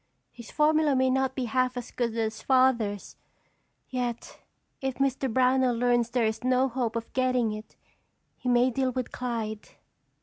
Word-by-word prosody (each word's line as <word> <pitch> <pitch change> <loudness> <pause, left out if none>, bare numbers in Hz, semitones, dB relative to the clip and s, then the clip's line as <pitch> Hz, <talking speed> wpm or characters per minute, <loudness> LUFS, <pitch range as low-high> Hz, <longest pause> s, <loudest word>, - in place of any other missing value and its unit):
His 235 -2 -12
formula 305 -1 +3
may 260 0 +3
not 265 0 0
be 260 - -2
half 255 +2 0
as 245 - -6
good 235 -2 -2
as 220 -1 -2
Father's, 240 -6 +1 0.7
yet 245 -2 -4 0.4
if 265 -1 -2
Mr. 270 -1 0
Brownell 255 0 +3
learns 240 0 +2
there 240 -1 +1
is 220 +1 -2
no 255 +1 +3
hope 240 -3 -2
of 230 0 -5
getting 255 -3 +1
it 215 0 -9 0.6
he 250 - -4
may 245 +1 +4
deal 260 +1 0
with 255 -1 -4
Clyde." 225 -4 -4
250 Hz, 160 wpm, -27 LUFS, 230-260 Hz, 0.7 s, may